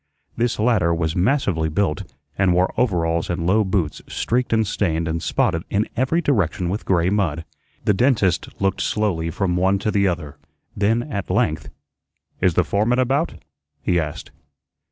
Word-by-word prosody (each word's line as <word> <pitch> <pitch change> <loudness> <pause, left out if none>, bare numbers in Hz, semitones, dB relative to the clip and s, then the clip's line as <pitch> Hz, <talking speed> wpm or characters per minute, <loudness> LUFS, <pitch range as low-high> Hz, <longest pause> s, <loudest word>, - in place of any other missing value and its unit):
This 120 0 0
latter 105 -7 +2
was 80 -1 -1
massively 95 - +1
built, 80 -4 -1 0.2
and 95 -2 +2
wore 90 +1 +2
overalls 85 -8 0
and 85 -1 -2
low 105 +5 +3
boots 95 -5 -1
streaked 125 +1 -1
and 110 -1 +3
stained 85 -5 -1
and 80 +1 -2
spotted 80 - 0
in 105 +2 0
every 130 +8 +1
direction 95 - +1
with 100 +4 -3
gray 90 -1 +2
mud. 85 -6 0 0.4
The 105 - +4
dentist 105 - +2
looked 95 -1 0
slowly 95 -7 0
from 90 +1 -1
one 95 +2 +2
to 100 +2 -1
the 100 -1 +2
other; 85 -6 -3 0.4
then 110 +4 +1
at 100 -9 -5
length, 95 -6 0 0.7
"Is 90 -3 +3
the 90 - +4
foreman 105 +10 +1
about?" 135 +6 0 0.4
he 90 - +2
asked. 75 -3 -5
95 Hz, 160 wpm, -21 LUFS, 85-110 Hz, 0.7 s, The